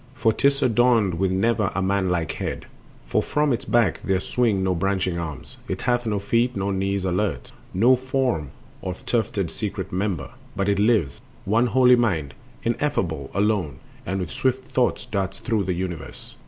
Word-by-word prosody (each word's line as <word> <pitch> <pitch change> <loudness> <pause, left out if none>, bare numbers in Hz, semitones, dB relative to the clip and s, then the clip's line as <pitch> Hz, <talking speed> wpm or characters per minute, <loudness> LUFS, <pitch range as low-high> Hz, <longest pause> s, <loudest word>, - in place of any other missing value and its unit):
For 115 -3 +2
'tis 140 +4 +2
adorned 115 -7 +3
with 95 0 +2
never 100 +2 +1
a 95 - +1
manlike 95 -4 0
head, - - -4 0.4
For - - +1
from 150 -2 +1
Its 120 - -3
back 115 -8 +2
there 95 -1 +1
swing 105 -2 +1
no 95 -1 +2
branching 95 -1 0
arms, 75 -6 -6
It - - -4
hath 120 -1 +1
no 105 -2 0
feet 115 +5 +1
nor 100 0 -1
knees 95 0 -1
alert, 90 -8 -1 0.2
nor 120 +8 +5
form 130 - -1 0.3
Of 90 -1 -6
tufted 100 -6 0
secret 100 -3 -4
member; 90 - -2 0.2
but 100 -1 0
It 100 -1 +2
lives, 105 - +2 0.2
One 115 +5 +3
holy 125 0 +6
mind, 85 - 0 0.3
ineffable, 95 - -1
alone, 100 -9 +1 0.3
And 95 +2 -2
with 90 - -4
swift 130 +1 -1
thoughts 125 -2 +1
darts 100 -2 -2
through 110 -4 -1
the 90 - 0
universe. 85 -3 -5
100 Hz, 170 wpm, -24 LUFS, 90-120 Hz, 0.4 s, holy